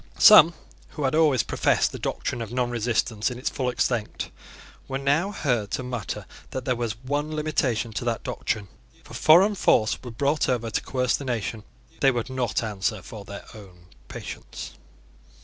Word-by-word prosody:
Some 170 -6 +9 0.4
who 150 - -4
had 130 - +1
always 155 -6 +4
professed - - +1
the - - -7
doctrine 120 - -3
of 115 -1 -5
non 125 -1 0
resistance 115 -1 0
in 125 - -6
its 125 - -2
full 130 -3 -1
extent 120 -2 -1 0.6
were 135 - -2
now 145 +8 +1
heard 120 - -1
to 130 - -1
mutter 125 -4 -4 0.2
that 130 - -5
there 125 - +1
was 115 -2 -2
one 145 +3 -2
limitation 130 -7 0
to 120 - -3
that 115 -2 -1
doctrine. 105 -3 -3 0.3
If - - -17
a - - -9
foreign 185 +7 +6
force 110 - +2
were 125 - -8
brought 140 +6 0
over 115 -3 -1
to - - 0
coerce 125 -3 0
the - - -5
nation, 115 -3 -3 0.4
they 135 - +5
would 120 0 -2
not 125 -4 -1
answer 105 -1 -2
for 105 -3 -9
their 100 0 -9
own 90 -5 -14 0.2
patience. - - -8
125 Hz, 180 wpm, -25 LUFS, 110-140 Hz, 0.6 s, Some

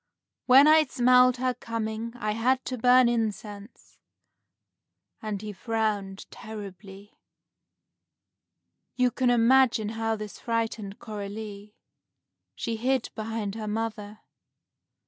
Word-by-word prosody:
When 270 +3 +8
I 310 0 +6
smelled 250 -1 +4
her 255 0 0
coming, 230 0 -5
I 215 -3 -2
had 255 +4 0
to 255 - -4
burn 250 +1 +5
incense;" 215 -2 -4 1.2
and 215 -2 -4
he 210 -1 -6
frowned 205 -2 -2
terribly. 205 -2 -10 1.8
You 250 -1 +2
can 255 0 0
imagine 240 -2 +3
how 225 0 -2
this 210 -1 -8
frightened 225 -3 -3
Coralie. 210 -1 -8 0.8
She 230 -1 -3
hid 255 +2 -1
behind 220 -2 -4
her 220 0 -6
mother. 215 -1 -4
225 Hz, 105 wpm, -26 LUFS, 210-245 Hz, 1.8 s, When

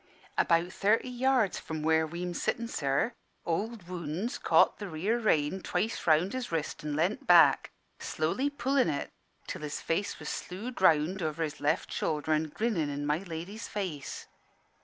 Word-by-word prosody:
"About 170 +2 +2
thirty 220 +5 +2
yards 250 -4 +2
from 160 -1 -5
where 160 0 +3
we'm 175 +2 -4
sittin', 235 +6 -1
sir, 140 - 0 0.3
Ould 205 +3 -2
Wounds 180 - -3
caught - - +4
the 205 - -5
near 190 +8 0
rein 175 -4 +1
twice 220 +1 -2
round 165 +4 +4
his 255 -4 -4
wrist 160 -2 -3
an 150 -1 -2
lean't 170 +7 0
back, 175 -2 +6 0.3
slowly 170 - -1
pullin' 270 - +1
it, 145 -2 -3 0.3
till - - -6
his 150 -1 -4
face 200 +5 -1
was - - -8
slewed 215 +7 -5
round 165 +2 +4
over 160 0 -1
his 155 -1 -4
left 150 +2 0
shoulder 155 0 0
an' 155 0 0
grinnin' 180 -4 -1
in 145 0 -3
my 150 +2 +1
lady's 185 +4 -6
face. 185 -9 -4
175 Hz, 160 wpm, -30 LUFS, 155-215 Hz, 0.3 s, back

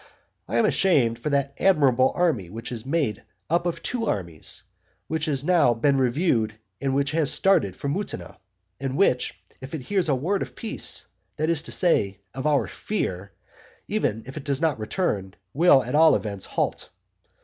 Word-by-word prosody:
I 115 - -1
am 115 - +4
ashamed 125 -12 +3
for 135 - -2
that 140 -1 0
admirable 135 -9 +4
army 150 - +1
which 115 +5 -7
is 120 0 -5
made 140 -9 0 0.3
up 170 +1 +2
of 170 - -3
two 230 -3 -2
armies, 85 -6 -3 0.4
which 160 -1 -2
has 140 -4 -1
now 165 -8 +4
been 140 +5 +2
reviewed, 125 -4 +1 0.3
and 135 -1 0
which 140 +1 +1
has 155 -2 +2
started 145 - +3
for 140 - -5
Mutina, 190 +8 -4 0.4
and 135 0 -3
which, 130 -10 +2 0.3
if 135 +5 -6
it 150 - -5
hears 190 +4 0
a 140 - +3
word 180 +10 -1
of - - -5
peace, 225 - -3 0.3
that 155 +2 0
is 160 -3 +1
to - - -7
say, 100 - +2 0.2
of 130 +3 -2
our 145 -2 +3
fear, 100 - -3 0.6
even 110 +2 -1
if 130 +4 -9
it 150 - -5
does 140 -1 0
not 160 -6 +1
return, 105 - -2 0.2
will 145 -3 +5
at 125 - -5
all 160 +1 +6
events 100 -3 -4
halt. - - -2
140 Hz, 180 wpm, -25 LUFS, 115-165 Hz, 0.6 s, all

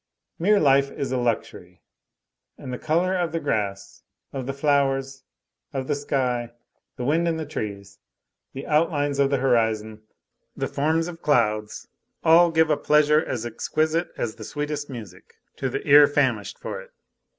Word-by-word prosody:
Mere 205 +5 +4
life 140 -2 +4
is 140 -2 -4
a 130 - 0
luxury, 120 -2 -3 0.7
and 130 - -7
the 125 - -5
color 175 +4 +1
of 175 -3 -1
the 165 - -2
grass, 100 -6 -3 0.3
of 130 -2 -5
the - - -1
flowers, 135 -2 0 0.5
of 135 -1 -3
the - - 0
sky, 125 -4 -1 0.4
the 125 - -5
wind 165 +5 +2
in 165 -1 0
the 160 - -4
trees, 100 -7 -6 0.5
the 135 - -7
outlines 150 -2 +1
of 140 -1 +3
the 140 - +1
horizon, 110 -4 0 0.6
the - - -1
forms 160 +3 0
of 170 -1 -9
clouds, 105 -6 0 0.4
all 170 +1 +6
give 160 -1 +2
a 150 - +2
pleasure 150 +1 +3
as 120 -6 -4
exquisite 155 +8 -1
as 110 - -2
the 110 - -11
sweetest 145 +4 -4
music 105 -8 -10 0.2
to - - -2
the - - -5
ear 145 +1 +8
famishing 130 -8 0
for - - -6
it. - - -16
140 Hz, 160 wpm, -24 LUFS, 120-155 Hz, 0.7 s, ear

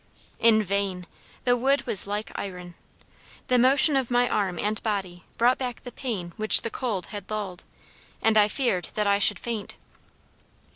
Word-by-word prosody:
In 220 -2 +4
vain! 195 -2 -2 0.4
the 245 -1 +3
wood 270 +3 +1
was 220 -5 +1
like 205 +1 -4
iron. 180 -3 -7 0.8
The 250 -1 +4
motion 270 +4 +5
of 265 -3 0
my 245 0 +2
arm 195 -6 -1
and 210 +1 -2
body 190 -5 -4
brought 240 +3 +3
back 250 -2 -5
the 245 - -8
pain 210 -10 -5
which 215 0 +6
the 230 - -3
cold 220 -8 -3
had 205 -2 -8
lulled, 205 -4 -5 0.6
and 225 0 +2
I 210 -1 +5
feared 210 -6 -1
that 210 - 0
I 200 0 +2
should 205 -1 +5
faint. 225 -2 -5
215 Hz, 165 wpm, -25 LUFS, 195-245 Hz, 0.8 s, which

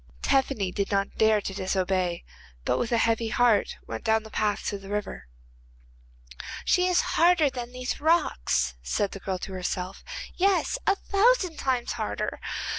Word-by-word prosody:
Tephany 260 -8 +1
did 200 - -1
not 200 0 0
dare 220 -1 +5
to 195 - -4
disobey, 185 -2 -1 0.4
but - - +1
with 240 - -2
a 235 - +3
heavy 230 0 +2
heart 225 -2 +2
went - - -6
down 220 -1 +2
the 220 - -12
path 210 -1 0
to 200 - -2
the 195 0 -11
river. 205 - -4 1.4
'She 360 0 +3
is 360 -1 +3 0.2
harder 335 -4 +5
than 245 -2 -6
these 250 +2 -4
rocks,' 310 - +2
said 195 - -1
the 195 - -7
girl 190 -1 -3
to 190 - -7
herself, 185 0 -4 0.3
'yes, 395 +6 +2
a 400 - +5
thousand 395 -4 +2
times 255 -3 0
harder. - - -3
220 Hz, 160 wpm, -27 LUFS, 195-275 Hz, 1.4 s, dare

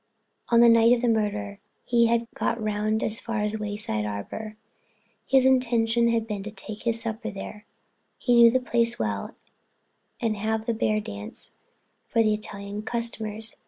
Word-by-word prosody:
On 235 -1 +5
the 235 - +8
night 230 0 +6
of 240 - +1
the - - +3
murder 210 -2 -1 0.2
he 235 -1 +3
had 235 0 +1
got 235 - -1
round 215 0 -1
as 220 +1 -2
far 230 -2 -3
as 210 - 0
the 220 - -3
Wayside 205 - -2
Arbor. 105 - -6 0.7
His 265 -1 +4
intention 235 -3 +3
had 230 -1 +1
been 210 -3 -4
to 210 - -6
take 215 +1 -8
his 230 -1 +1
supper 225 -1 -3
there—he 210 +4 -6
knew 235 -1 +8
the 255 +3 +2
place 235 -2 +1
well—and 110 - -6
have 220 +1 -1
the 235 - 0
bear 215 -1 +1
dance 100 - -8 0.5
for 230 -1 +2
the 215 -1 +3
Italian 205 -1 -5
customers. 225 -1 -4
220 Hz, 160 wpm, -26 LUFS, 210-235 Hz, 0.7 s, the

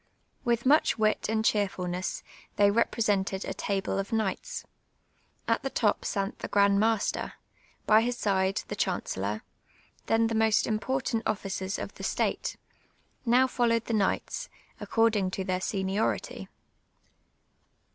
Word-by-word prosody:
^Vith 235 0 +1
much 290 0 +4
wit 215 -1 +1
and 220 0 0
checrfubiess 185 -4 -1 0.3
they 205 0 +5
represented 205 -3 +1
a - - -3
table 195 -1 -1
of 195 - -3
kni«;ht8. 220 - -2 0.8
At 230 - +2
the 270 - -2
top 215 -5 +1 0.2
wit 195 0 -2
the - - -5
f^"and 200 -1 +4
master, 220 0 0 0.5
by 215 +1 +6
his 245 +1 -1
side 190 -2 +1
the - - -4
chancellor, 100 +3 -2 0.6
then 225 0 +3
the 225 - -1
most 220 -1 +3
im])ortant 230 +1 -1
officers 195 -1 -2
of - - -6
the - - -10
state; - - -1 0.7
now 250 +3 +5
followed 235 -3 +1
the 235 - -3
knights, 205 -3 0 0.3
according 220 -4 +2
to 190 +1 -3
their 185 0 -1
seniority. 195 +2 -2
215 Hz, 130 wpm, -28 LUFS, 195-230 Hz, 0.8 s, by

